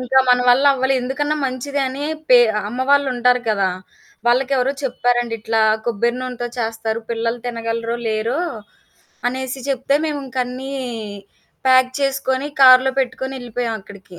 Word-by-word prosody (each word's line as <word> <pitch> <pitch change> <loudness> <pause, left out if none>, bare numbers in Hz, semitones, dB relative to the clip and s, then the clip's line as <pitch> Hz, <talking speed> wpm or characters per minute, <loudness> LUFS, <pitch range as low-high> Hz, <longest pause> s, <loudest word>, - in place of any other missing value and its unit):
ఇంకా 260 +1 +2
మన 250 0 +5
వల్ల 255 +3 +5
అవ్వలే. 265 0 +1
ఎందుకన్నా 290 +4 -1
మంచిదని 270 +1 -3 0.3
పే 250 - +9 0.3
అమ్మవాళ్ళుంటారు 250 -1 +2
గదా! 200 -3 +2 0.6
వాళ్ళకెవరో 260 +1 +2
చెప్పారండి, 240 -2 0
ఇట్లా 225 0 0 0.2
కొబ్బెరి 235 +1 0
నూనెతో 250 -1 -4
చేస్తారు 225 -1 -2
పిల్లలు 230 +1 -1
తినగలరో 230 0 -3
లేరో, 220 +5 -1 0.9
అనేసి 260 +1 -4
చెప్తే 270 +1 0
మేము 295 -2 -2
ఇంకన్నీ 255 +1 -4 1.0
ప్యాక్ 255 0 +5
చేసుకొని, 275 0 -1
కారులో 260 0 +7
పెట్టుకొని, 265 +1 -3
ఎళ్ళిపోయామక్కడికి. 215 -6 -6
250 Hz, 115 wpm, -19 LUFS, 235-265 Hz, 1.0 s, పే